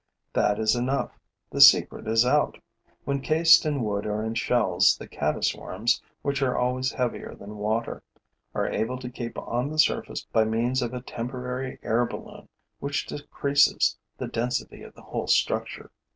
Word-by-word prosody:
That 105 Hz, -, +2 dB
is 110 Hz, +1 st, +2 dB
enough: 130 Hz, +3 st, -1 dB, 0.4 s
the -, -, 0 dB
secret -, -, +6 dB
is 115 Hz, +2 st, +3 dB
out. 145 Hz, +4 st, +2 dB, 0.5 s
When 140 Hz, 0 st, -1 dB
cased 160 Hz, +2 st, +5 dB
in 145 Hz, -5 st, -1 dB
wood 105 Hz, -1 st, -2 dB
or 105 Hz, +1 st, -2 dB
in 110 Hz, 0 st, -2 dB
shells, 115 Hz, -5 st, +3 dB
the -, -, -10 dB
caddis -, -, -1 dB
worms, 115 Hz, +6 st, -1 dB, 0.2 s
which 140 Hz, 0 st, -1 dB
are 130 Hz, -2 st, +1 dB
always 130 Hz, +2 st, 0 dB
heavier 125 Hz, -2 st, -3 dB
than 105 Hz, +1 st, -10 dB
water, 110 Hz, +2 st, -2 dB, 0.5 s
are -, -, 0 dB
able 115 Hz, +4 st, -2 dB
to 125 Hz, -1 st, -7 dB
keep 120 Hz, -1 st, -6 dB
on 125 Hz, +4 st, -2 dB
the 155 Hz, -, -6 dB
surface 155 Hz, -, +1 dB
by 110 Hz, -, +1 dB
means 120 Hz, +4 st, 0 dB
of 120 Hz, 0 st, -3 dB
a 125 Hz, -, -4 dB
temporary 125 Hz, +1 st, -5 dB
air 120 Hz, +2 st, +1 dB
balloon -, -, -10 dB, 0.3 s
which 140 Hz, +1 st, -2 dB
decreases 145 Hz, -1 st, +1 dB, 0.2 s
the -, -, -4 dB
density 125 Hz, +2 st, -3 dB
of -, -, -12 dB
the -, -, -15 dB
whole -, -, -4 dB
structure. -, -, 0 dB
125 Hz, 165 wpm, -26 LUFS, 110-135 Hz, 0.5 s, secret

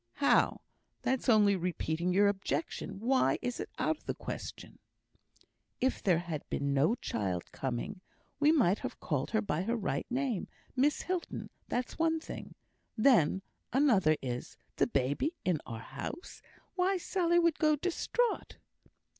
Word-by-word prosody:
"How? 280 Hz, -, +3 dB, 0.4 s
that's 260 Hz, 0 st, 0 dB
only 210 Hz, -3 st, +6 dB
repeating 175 Hz, -1 st, -1 dB
your 200 Hz, +3 st, +5 dB
objection. 195 Hz, -2 st, -2 dB
Why 255 Hz, +4 st, +3 dB
is 245 Hz, -1 st, -3 dB
it -, -, -4 dB
out 315 Hz, -, +1 dB
of -, -, -28 dB
the -, -, -1 dB
question?" -, -, -7 dB, 1.0 s
"If 260 Hz, +1 st, +1 dB
there 180 Hz, -4 st, +3 dB
had 165 Hz, -3 st, -3 dB
been 140 Hz, 0 st, 0 dB
no 145 Hz, -, +3 dB
child 95 Hz, -, -3 dB
coming, 135 Hz, -, -4 dB, 0.4 s
we 295 Hz, +1 st, +5 dB
might 215 Hz, -, +3 dB
have -, -, -6 dB
called 145 Hz, -4 st, -1 dB
her 220 Hz, -, +1 dB
by 170 Hz, -5 st, -1 dB
her 230 Hz, +5 st, 0 dB
right 215 Hz, -5 st, -2 dB
name 255 Hz, -4 st, -1 dB, 0.3 s
Miss 280 Hz, +3 st, +2 dB
Hilton; 365 Hz, -2 st, -3 dB, 0.2 s
that's 250 Hz, +5 st, -3 dB
one 325 Hz, 0 st, +2 dB
thing. -, -, -8 dB, 0.4 s
Then, 205 Hz, -, +4 dB, 0.3 s
another 215 Hz, -, +4 dB
is, 125 Hz, -1 st, -4 dB, 0.2 s
the -, -, +3 dB
baby 140 Hz, -, 0 dB
in 175 Hz, -5 st, +1 dB
our 115 Hz, -1 st, -6 dB
house. 350 Hz, -, -7 dB, 0.3 s
Why, 380 Hz, +1 st, +2 dB
Sally 345 Hz, -1 st, +1 dB
would 335 Hz, -2 st, +3 dB
go 305 Hz, -2 st, +4 dB
distraught!" 370 Hz, -, -1 dB
215 Hz, 145 wpm, -32 LUFS, -, 1.0 s, only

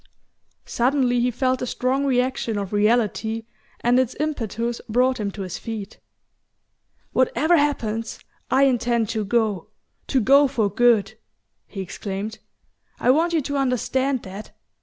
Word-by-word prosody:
Suddenly 245 Hz, 0 st, +1 dB
he 245 Hz, +1 st, +2 dB
felt 255 Hz, +1 st, 0 dB
the 250 Hz, -, -3 dB
strong 260 Hz, +3 st, 0 dB
reaction 250 Hz, -4 st, 0 dB
of 200 Hz, 0 st, -4 dB
reality 220 Hz, +1 st, +1 dB, 0.4 s
and 245 Hz, +1 st, +3 dB
its 260 Hz, -1 st, 0 dB
impetus 235 Hz, -6 st, -2 dB
brought 250 Hz, +3 st, +2 dB
him 205 Hz, -1 st, -1 dB
to 200 Hz, 0 st, -6 dB
his 185 Hz, -2 st, -6 dB
feet. 220 Hz, -3 st, -7 dB, 1.1 s
"Whatever 270 Hz, +6 st, +3 dB
happens, 230 Hz, -7 st, -1 dB, 0.3 s
I 265 Hz, +1 st, +4 dB
intend 240 Hz, -4 st, +1 dB
to 220 Hz, -2 st, -1 dB
go 210 Hz, -3 st, 0 dB, 0.4 s
to 265 Hz, -, +2 dB
go 275 Hz, +5 st, +5 dB
for 225 Hz, -7 st, 0 dB
good," 220 Hz, -2 st, +3 dB, 0.5 s
he 195 Hz, -, -6 dB
exclaimed. 200 Hz, +3 st, -5 dB, 0.6 s
"I 250 Hz, -, +4 dB
want 330 Hz, +5 st, +2 dB
you 320 Hz, -, +2 dB
to 285 Hz, +1 st, -3 dB
understand 260 Hz, 0 st, 0 dB
that. 195 Hz, +3 st, -9 dB
240 Hz, 140 wpm, -23 LUFS, 215-260 Hz, 1.1 s, go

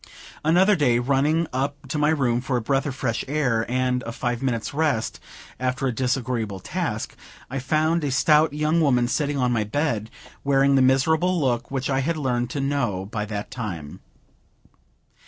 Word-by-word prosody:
Another 180 Hz, +6 st, +4 dB
day, 125 Hz, -8 st, +3 dB
running 140 Hz, +6 st, +2 dB
up 135 Hz, +2 st, -1 dB
to 155 Hz, -, -1 dB
my 150 Hz, +1 st, +3 dB
room 125 Hz, -6 st, +1 dB
for 130 Hz, 0 st, -1 dB
a -, -, -1 dB
breath 135 Hz, +4 st, 0 dB
of 135 Hz, -, -4 dB
fresh 115 Hz, -3 st, -2 dB
air 125 Hz, -6 st, 0 dB
and 125 Hz, 0 st, 0 dB
a 115 Hz, -, -6 dB
five 120 Hz, 0 st, -3 dB
minutes' 120 Hz, -4 st, -2 dB
rest 145 Hz, -7 st, 0 dB, 0.4 s
after 130 Hz, +1 st, -1 dB
a 130 Hz, -, +1 dB
disagreeable 120 Hz, -5 st, -1 dB
task, -, -, -3 dB, 0.4 s
I 135 Hz, -, -2 dB
found 155 Hz, +5 st, +1 dB
a 145 Hz, -, 0 dB
stout 150 Hz, +4 st, +4 dB
young 155 Hz, +3 st, +1 dB
woman 125 Hz, -5 st, +3 dB
sitting 145 Hz, +2 st, -1 dB
on 125 Hz, -2 st, +1 dB
my 115 Hz, -3 st, +1 dB
bed, 110 Hz, -2 st, -1 dB, 0.3 s
wearing 140 Hz, 0 st, +3 dB
the 135 Hz, -, +4 dB
miserable 160 Hz, +7 st, +3 dB
look 125 Hz, -5 st, 0 dB
which 135 Hz, -1 st, -2 dB
I 135 Hz, -1 st, +1 dB
had 160 Hz, +4 st, -1 dB
learned 125 Hz, -4 st, -1 dB
to 140 Hz, -, -4 dB
know 135 Hz, -9 st, -1 dB
by 105 Hz, -1 st, -2 dB
that 105 Hz, -1 st, -5 dB
time. 90 Hz, -, -6 dB
130 Hz, 175 wpm, -24 LUFS, 120-150 Hz, 0.4 s, Another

